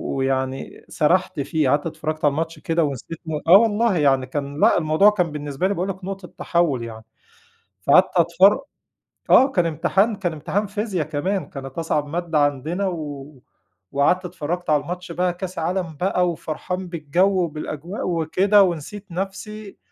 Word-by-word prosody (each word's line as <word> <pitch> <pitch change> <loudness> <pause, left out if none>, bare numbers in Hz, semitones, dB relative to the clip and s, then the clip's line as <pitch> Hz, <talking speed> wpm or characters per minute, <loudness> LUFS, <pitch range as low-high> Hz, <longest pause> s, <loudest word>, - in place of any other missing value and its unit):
ويعني 135 0 -2
سرحت 170 0 +1
فيه، 145 0 0
قعدت 145 +4 +2
اتفرّجت 155 -1 -3
على 145 - +5
الماتش 165 +2 -3
كده 165 +2 0
ونسيت 145 +3 -4
م 160 - -5 0.2
آه 180 +4 +10
والله، 225 -1 +2
يعني 135 -4 +3
كان، 140 +2 -5
لأ، - - +5
الموضوع 160 +5 +4
كان 180 -6 0
بالنسبة 145 +3 -2
لي 200 - 0
باقول 190 +1 -2
لك، 190 -1 -6
نقطة 195 -1 -6
تحوّل 165 -8 +1
يعني، 110 -1 -9 0.8
فقعدت 180 +6 +6
أتفر 180 +7 +5 0.7
آه 265 - +7
كان 175 -6 +2
امتحان 185 +7 +1
كان 180 -4 -2
امتحان 185 +7 -2
فيزيا 205 -4 -2
كمان، 175 +6 -2
كانت 135 +2 -8
أصعب 150 -2 0
مادة 170 0 -1
عندنا، 145 +7 0
و 150 -4 -6 0.6
وقعدت 160 +7 +2
اتفرّجت 175 0 -4
على 150 -1 +3
الماتش 180 0 -6
بقى 180 +1 0
كاس 185 0 -6
عالم 170 -1 -2
بقى 180 -1 +1
وفرحان 180 +3 -5
بالجو 175 +4 +1
وبالأجواء 155 +4 -5
وكده 185 +5 +3
ونسيت 190 +3 -2
نفْسي، 195 +3 -6
170 Hz, 155 wpm, -22 LUFS, 150-185 Hz, 0.8 s, آه